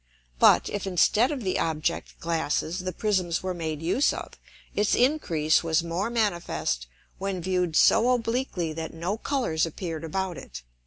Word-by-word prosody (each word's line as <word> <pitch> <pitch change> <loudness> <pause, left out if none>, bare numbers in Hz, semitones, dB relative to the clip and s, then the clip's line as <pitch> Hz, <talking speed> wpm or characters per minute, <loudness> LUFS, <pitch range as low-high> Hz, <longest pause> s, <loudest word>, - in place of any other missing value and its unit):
But, - - +6
if 200 -1 -3
instead 210 - +3
of 275 -5 -4
the 185 - 0
Object 160 +1 -2
glasses 165 +1 -1
the 185 0 -3
Prisms 185 -3 0
were 185 0 -2
made 160 -3 -4
use 215 - +2
of, - - -6 0.4
its 205 0 +2
Increase 170 - +2
was 165 0 +1
more 170 +6 -2
manifest 175 - -1 0.3
when 195 -1 -2
viewed 180 -2 -1
so 230 +8 +5
obliquely 230 -8 -1
that 160 +1 -6
no 175 +5 -2
Colours 235 - 0
appear'd 165 -1 -5
about 185 +2 -3
it. - - -10
180 Hz, 155 wpm, -26 LUFS, 165-210 Hz, 0.4 s, But